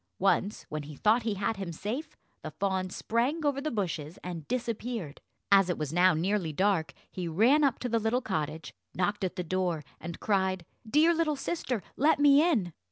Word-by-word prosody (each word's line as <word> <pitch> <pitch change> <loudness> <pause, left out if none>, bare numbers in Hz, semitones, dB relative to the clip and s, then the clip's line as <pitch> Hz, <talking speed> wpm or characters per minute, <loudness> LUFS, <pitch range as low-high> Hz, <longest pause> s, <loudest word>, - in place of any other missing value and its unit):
Once, 195 +1 +1
when 155 0 -4
he 150 +1 -9
thought 220 - +3
he 220 -2 -1
had 200 +2 -1
him 190 -3 -4
safe, 215 - -5 0.2
the - - -5
fawn 190 -2 -1
sprang 250 - -1
over 280 -1 +1
the 310 - -1
bushes 170 - -3
and 170 -4 -6
disappeared. 230 - -3 0.3
As 195 -2 +6
it 175 - 0
was 150 -1 -3
now 180 0 +5
nearly 180 0 0
dark, 175 -2 +1 0.2
he 180 -2 -4
ran 230 - +4
up 270 -4 +3
to 250 - -3
the 230 -1 +1
little 225 +3 +1
cottage, 155 - -4 0.2
knocked 205 +3 0
at 185 - -2
the 180 - -2
door, 175 -2 -1 0.2
and 170 +1 -7
cried, 190 -3 0 0.2
"Dear 310 +6 +5
little 320 -2 +1
sister, 265 - -3
let 300 +4 +4
me 290 0 +6
in." 235 - +1
200 Hz, 190 wpm, -29 LUFS, 175-245 Hz, 0.3 s, As